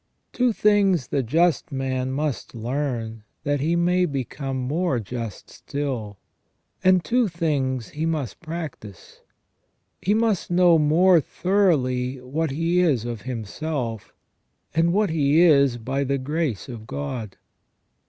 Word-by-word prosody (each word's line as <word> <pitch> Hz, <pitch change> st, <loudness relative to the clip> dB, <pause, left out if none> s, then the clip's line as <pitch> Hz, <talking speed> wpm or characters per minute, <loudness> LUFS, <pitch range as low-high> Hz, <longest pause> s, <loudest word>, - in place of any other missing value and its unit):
Two 250 Hz, -1 st, +2 dB
things 200 Hz, -, +2 dB
the 140 Hz, -, +1 dB
just 160 Hz, +5 st, +1 dB
man 130 Hz, -1 st, -2 dB
must 145 Hz, -2 st, -3 dB
learn 115 Hz, -2 st, -3 dB, 0.2 s
that 145 Hz, 0 st, 0 dB
he 160 Hz, +5 st, +1 dB
may 180 Hz, +1 st, +2 dB
become 135 Hz, -1 st, -4 dB
more 140 Hz, +2 st, 0 dB
just 115 Hz, -1 st, -6 dB
still, 125 Hz, -8 st, -4 dB, 0.7 s
and 185 Hz, -1 st, +4 dB
two 245 Hz, -1 st, +2 dB
things 140 Hz, -, -1 dB
he 155 Hz, +2 st, -3 dB
must 155 Hz, -7 st, -3 dB
practise. 155 Hz, -, -8 dB, 0.8 s
He 205 Hz, +3 st, +2 dB
must 220 Hz, -4 st, +1 dB
know 175 Hz, -2 st, +5 dB
more 165 Hz, +3 st, +5 dB
thoroughly 135 Hz, -9 st, +1 dB
what 145 Hz, +6 st, -2 dB
he 165 Hz, +5 st, +1 dB
is 145 Hz, -11 st, +2 dB
of 120 Hz, -3 st, -5 dB
himself, 120 Hz, 0 st, -4 dB, 0.6 s
and 165 Hz, +3 st, +3 dB
what 205 Hz, -1 st, +2 dB
he 150 Hz, 0 st, +3 dB
is 140 Hz, -7 st, +5 dB
by 130 Hz, +4 st, -2 dB
the 140 Hz, 0 st, 0 dB
grace 145 Hz, -, -2 dB
of 115 Hz, -4 st, -9 dB
God. 95 Hz, -, -5 dB
145 Hz, 130 wpm, -24 LUFS, 125-170 Hz, 0.8 s, know